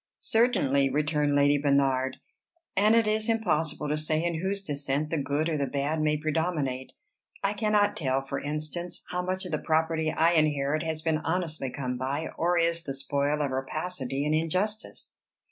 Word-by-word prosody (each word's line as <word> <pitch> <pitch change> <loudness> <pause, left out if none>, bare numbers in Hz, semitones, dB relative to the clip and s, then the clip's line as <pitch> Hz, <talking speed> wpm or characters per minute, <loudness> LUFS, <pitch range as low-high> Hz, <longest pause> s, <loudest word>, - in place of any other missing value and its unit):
"Certainly," 185 - +2
returned 150 +1 +1
Lady 145 0 +4
Bernard; 135 -2 +2 0.6
"and 215 +3 +5
it 230 -1 +4
is 215 +1 0
impossible 165 -9 0
to 150 - 0
say 155 +1 0
in 170 -2 -1
whose 195 +1 -1
descent 145 -1 -2
the 160 -3 0
good 145 +3 0
or 160 -2 0
the 140 -1 0
bad 145 +4 -1
may 150 0 +2
predominate. 150 -4 -1 0.5
I 195 +1 +1
cannot 210 -1 +2
tell, 135 -3 0
for 135 - -4
instance, 155 +4 -3
how 180 0 -1
much 185 +1 -2
of 180 - -6
the 155 - 0
property 160 0 +1
I 165 +1 +3
inherit 155 -2 +2
has 160 -1 -3
been 160 -2 +1
honestly 160 -4 -2
come 125 -1 -4
by, 140 +4 -2
or 175 +1 +1
is 170 0 +2
the 135 -4 -4
spoil 145 +2 0
of 140 - -1
rapacity 135 0 -2
and 150 - +1
injustice." 185 +7 -1
155 Hz, 175 wpm, -28 LUFS, 140-175 Hz, 0.6 s, and